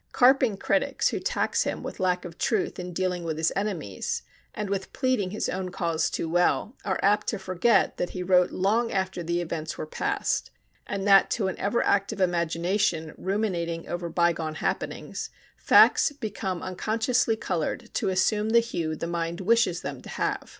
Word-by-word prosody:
Carping 255 -4 +4
critics - - +1
who - - -2
tax - - 0
him - - -2
with - - -7
lack 180 -1 0
of 170 -1 -9
truth 215 -5 0
in 180 0 -5
dealing 180 0 -1
with 160 -2 -3
his 160 +1 +1
enemies, 185 - -3 0.3
and 210 - -4
with 195 -1 -3
pleading 255 -8 0
his 210 - -2
own 185 0 -3
cause 170 -2 -1
too - - -3
well, 175 +8 +1
are 190 -2 -1
apt 205 +2 +3
to 215 - 0
forget 190 +3 +2
that 175 - -1
he 180 - -5
wrote 180 -1 +4
long 220 +5 +1
after 190 -2 -1
the 170 +1 -1
events 160 -2 -4
were - - -4
past, 155 - -1 0.4
and 200 0 -3
that 195 -1 +6
to 205 -4 0
an 185 - -6
ever 205 +4 +1
active 200 +1 +1
imagination 170 -1 0
ruminating 180 -4 -2
over 175 0 -4
bygone 165 -2 0
happenings, - - -3 0.3
facts - - +5
become 200 -8 -4
unconsciously 220 +5 0
colored 175 -7 -3
to - - 0
assume 210 +3 +1
the 235 +1 +6
hue 170 -9 -2
the 160 - -4
mind 170 0 -3
wishes 220 -3 +2
them 140 -2 -5
to - - -11
have. - - -2
185 Hz, 175 wpm, -26 LUFS, 170-210 Hz, 0.4 s, that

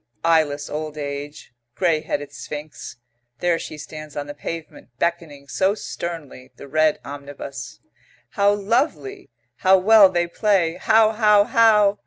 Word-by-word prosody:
Eyeless 155 -3 +2
old 155 0 -5
age, 145 -2 -7 0.2
grey 165 -4 +1
headed 145 -2 -4
Sphinx.... 140 -1 -8 0.4
There 175 +1 0
she 155 - -8
stands 155 -1 -9
on 145 - -3
the 145 - -7
pavement, 155 -2 -8
beckoning, 160 -4 -3
so 190 +7 +1
sternly, 165 -10 -7
the 140 - -12
red 155 +2 +2
omnibus. 140 -5 -8 0.5
"How 200 0 +2
lovely! 200 - -1 0.3
How 190 +1 +5
well 200 +1 +7
they 175 -1 0
play! 175 -2 +1
How 220 +2 +4
how 210 -2 +4
how!" 210 -2 +4
160 Hz, 135 wpm, -22 LUFS, 145-195 Hz, 0.5 s, well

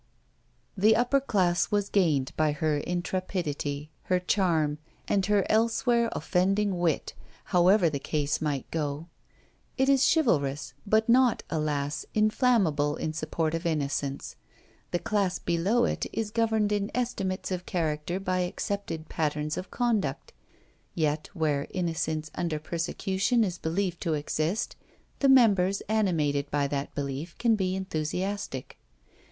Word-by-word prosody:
The 215 +3 +5
upper 245 +4 +3
class 185 -9 +1
was 205 -1 +1
gained 155 -11 +2
by 155 -1 +2
her 150 0 0
intrepidity, 170 -4 -3
her 180 -1 +2
charm, 165 -6 +1 0.3
and 195 - +2
her 205 -2 +3
elsewhere 230 +1 +2
offending 195 +1 +1
wit, 165 -4 0 0.3
however 180 +1 +4
the 145 -3 -1
case 150 0 -1
might 145 -4 -1
go. 150 +1 -3 0.7
It 265 +1 +3
is 275 -1 +5
chivalrous, 145 - +1
but 220 +2 +3
not, 245 0 +4
alas, 150 -2 -2
inflammable 210 - +2
in 155 -1 -3
support 155 0 -2
of 165 +1 -1
innocence. 140 -3 -2 0.5
The - - 0
class 195 -1 0
below 190 +8 +1
it - - -2
is 220 -2 -3
governed 220 -2 +1
in 205 -1 0
estimates 195 -7 -2
of 180 -1 -3
character 160 +1 -1
by 185 -1 -1
accepted 180 -2 -3
patterns 150 -1 -1
of 185 - -6
conduct; 235 -5 -1 0.6
yet 155 -2 0
where 150 -4 0
innocence 165 -3 -2
under 170 -3 -2
persecution 190 +8 0
is 180 -4 -2
believed 175 +2 -2
to 165 -4 0
exist, 155 +6 -2 0.4
the 275 - +4
members 200 -7 +5
animated 155 -10 0
by 145 -1 +1
that 140 0 -3
belief 140 +4 -4
can 230 -2 +3
be 190 -2 -1
enthusiastic. 185 -3 -3
175 Hz, 130 wpm, -28 LUFS, 155-205 Hz, 0.7 s, The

